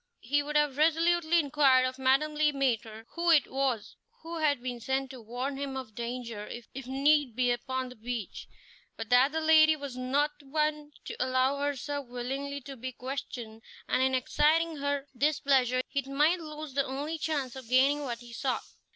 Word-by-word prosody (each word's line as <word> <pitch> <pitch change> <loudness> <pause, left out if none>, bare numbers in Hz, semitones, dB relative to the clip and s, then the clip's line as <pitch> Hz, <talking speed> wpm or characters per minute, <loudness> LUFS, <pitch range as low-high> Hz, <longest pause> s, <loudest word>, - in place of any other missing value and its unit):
He 290 +5 +1
would 295 +1 -6
have 295 -2 +2
resolutely 330 +1 +3
inquired 280 -4 +4
of 255 +1 -4
Madame 270 +4 +2
Le 300 0 +2
Maître 225 -5 -1
who 345 0 -1
it 310 -5 +5
was 265 -5 -1 0.3
who 335 0 -5
had 290 -4 +2
been 250 -1 -4
sent 265 +3 -2
to 255 -2 -10
warn 250 +5 -4
him 275 -1 -4
of 255 -5 -7
danger 235 -2 -5
if 240 +2 -9
need 275 -1 +2
be 250 0 +2
upon 260 +1 -2
the 250 - -11
beach, 230 -2 -6 0.5
but 225 -1 -6
that 250 +3 +5
the 320 - -1
lady 315 0 +6
was 280 -4 -7
not 275 +4 +1
one 300 +1 -1
to - - -6
allow 260 +2 +1
herself 285 -1 -3
willingly 270 +4 -4
to 275 +1 -9
be 255 +1 -6
questioned, 245 -3 -6 0.3
and 255 - +1
in 260 0 +2
exciting 310 +5 +2
her 285 0 -1
displeasure 270 -3 +2
he 280 0 -1
might 295 +6 +2
lose 305 -3 -8
the 275 +1 +2
only 290 +5 -4
chance 285 -6 -2
of 260 -3 -10
gaining 275 +3 +4
what 240 -4 -4
he 240 -1 -12
sought. 255 +2 -1
270 Hz, 180 wpm, -29 LUFS, 255-295 Hz, 0.5 s, lady